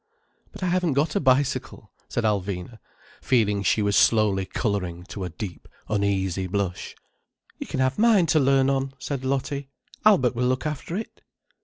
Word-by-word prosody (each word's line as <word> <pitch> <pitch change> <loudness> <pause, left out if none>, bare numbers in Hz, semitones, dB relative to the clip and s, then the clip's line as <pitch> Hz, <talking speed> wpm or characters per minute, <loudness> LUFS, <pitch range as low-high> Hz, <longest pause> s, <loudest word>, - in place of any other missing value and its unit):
"But - - -9
I - - +1
haven't 180 -3 +1
got 150 +3 0
a - - +3
bicycle," 130 -4 0 0.2
said 120 - -2
Alvina, 100 0 -2 0.4
feeling 105 -5 +2
she 105 +2 +2
was 100 0 +1
slowly 105 -4 +3
colouring 90 -5 -2
to 100 - -5
a - - -4
deep, 85 +2 -8 0.2
uneasy 95 -3 0
blush. 95 -1 -3 0.6
"You - - -6
can 130 - -2
have 130 +7 0
mine 215 -5 +5
to 155 - +4
learn 135 -1 +3
on," 135 0 0
said 140 -2 -4
Lottie. 140 +1 -2 0.3
"Albert 165 - +4
will 125 +1 0
look 130 +3 -1
after 155 +4 -3
it." 220 - -7
125 Hz, 165 wpm, -25 LUFS, 100-140 Hz, 0.6 s, mine